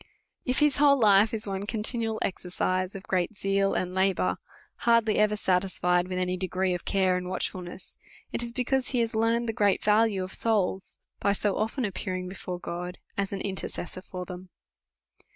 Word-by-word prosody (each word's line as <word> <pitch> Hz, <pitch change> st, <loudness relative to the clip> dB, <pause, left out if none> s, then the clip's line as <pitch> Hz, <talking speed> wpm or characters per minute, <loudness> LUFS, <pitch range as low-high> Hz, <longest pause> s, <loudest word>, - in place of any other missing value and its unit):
If 255 Hz, 0 st, 0 dB
his 295 Hz, -2 st, +4 dB
whole 285 Hz, -1 st, +6 dB
life 210 Hz, -2 st, +6 dB
is 220 Hz, -2 st, -4 dB
one 195 Hz, 0 st, -4 dB
continual 225 Hz, 0 st, 0 dB
exercise 185 Hz, 0 st, -1 dB
of 195 Hz, -, -7 dB
great 185 Hz, +3 st, -1 dB
zeal 195 Hz, 0 st, +1 dB
and 180 Hz, 0 st, -1 dB
labour, 190 Hz, 0 st, +1 dB, 0.4 s
hardly 230 Hz, -2 st, +3 dB
ever 210 Hz, 0 st, +3 dB
satisfied 180 Hz, -2 st, +1 dB
with 185 Hz, 0 st, -3 dB
any 185 Hz, 0 st, 0 dB
degrees 185 Hz, 0 st, 0 dB
of 175 Hz, -, -5 dB
care 190 Hz, -2 st, +2 dB
and 180 Hz, 0 st, -4 dB
watchfulness, 185 Hz, 0 st, -5 dB, 0.3 s
it -, -, -1 dB
is 235 Hz, 0 st, -3 dB
because 255 Hz, +1 st, 0 dB
he 250 Hz, -, 0 dB
has 230 Hz, 0 st, -1 dB
learned 230 Hz, +2 st, +1 dB
the 225 Hz, -, -1 dB
great 205 Hz, -2 st, +2 dB
value 210 Hz, -2 st, +3 dB
of 185 Hz, -, -7 dB
souls, 200 Hz, -4 st, 0 dB, 0.2 s
by 200 Hz, -, +2 dB
so 205 Hz, 0 st, 0 dB
often 230 Hz, +4 st, -1 dB
appear 190 Hz, -2 st, -3 dB
ing 180 Hz, 0 st, -4 dB
before 180 Hz, -1 st, -5 dB
God, 180 Hz, +1 st, -5 dB, 0.2 s
as 200 Hz, -1 st, -1 dB
an 200 Hz, -, -3 dB
intercessor 190 Hz, -2 st, -4 dB
for 185 Hz, -1 st, -7 dB
them. 180 Hz, 0 st, -9 dB
195 Hz, 180 wpm, -27 LUFS, 185-220 Hz, 0.4 s, whole